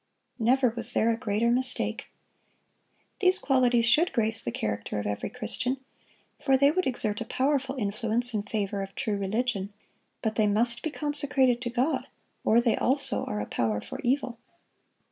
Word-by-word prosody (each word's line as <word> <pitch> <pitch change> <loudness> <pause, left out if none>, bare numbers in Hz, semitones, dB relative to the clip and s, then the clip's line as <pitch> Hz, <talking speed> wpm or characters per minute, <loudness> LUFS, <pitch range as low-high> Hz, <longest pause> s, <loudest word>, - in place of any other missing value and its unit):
Never 250 +2 +3
was 235 +1 +1
there 230 +1 +3
a - - +1
greater 225 0 0
mistake. 255 +1 -2 1.1
These 370 -1 +5
qualities 250 -6 +2
should 305 +10 +3
grace 225 -1 +2
the 120 - -2
character 105 -1 -3
of 105 - -3
every 105 0 -3
Christian, 250 +1 -1 0.6
for 270 -1 +3
they 280 +2 +5
would 370 +3 0
exert 215 -5 -1
a - - -3
powerful 270 +1 0
influence 230 +2 0
in 210 - 0
favor 205 -1 -3
of 195 0 -7
true 215 - -1
religion; 200 0 -1 0.5
but 220 -2 -1
they 215 -2 +3
must 235 +3 +2
be 315 - -2
consecrated 285 -4 +1
to 240 - -3
God, 250 +6 -1 0.4
or 225 - +4
they 240 -1 +2
also 275 +2 0
are 105 - -3
a - - -3
power 110 -2 -1
for - - -8
evil. 250 -2 -1
235 Hz, 165 wpm, -27 LUFS, 210-260 Hz, 1.1 s, These